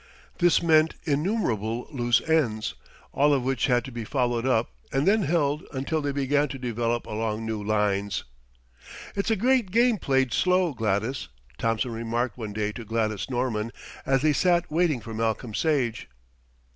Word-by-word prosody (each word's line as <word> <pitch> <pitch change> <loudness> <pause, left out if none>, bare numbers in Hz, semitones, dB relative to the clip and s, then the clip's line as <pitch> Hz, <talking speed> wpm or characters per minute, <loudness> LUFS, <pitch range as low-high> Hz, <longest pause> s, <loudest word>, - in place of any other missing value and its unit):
This 175 -1 +4
meant 160 -1 +4
innumerable 140 - -1
loose 120 -3 +1
ends, 125 -10 +1 0.4
all 145 +1 +4
of 130 - -1
which 130 +1 0
had 125 -1 +2
to 135 - -8
be 120 -1 -5
followed 120 0 0
up 120 -3 +1 0.2
and 135 +5 +1
then 215 +2 +4
held 150 -3 +1
until 145 +4 -1
they 145 -1 -1
began 145 +1 +1
to 135 - -6
develop 120 -1 -2
along 110 0 -3
new 110 -2 -3
lines. 100 -1 0 0.9
"It's 200 +2 -1
a 225 - +3
great 245 0 +2
game 230 +1 +3
played 135 -4 +1
slow, 180 -3 +2
Gladys," 110 - -1 0.3
Thompson 115 +2 0
remarked 115 +1 -2
one 110 -4 -6
day 105 0 -2
to 120 - -8
Gladys 110 -1 -2
Norman 120 -3 -1 0.3
as 135 0 +1
they 155 -1 +4
sat 175 +1 +2
waiting 160 -6 +1
for 110 - -8
Malcolm 110 0 -2
Sage. 130 -5 0
125 Hz, 160 wpm, -26 LUFS, 115-155 Hz, 0.9 s, This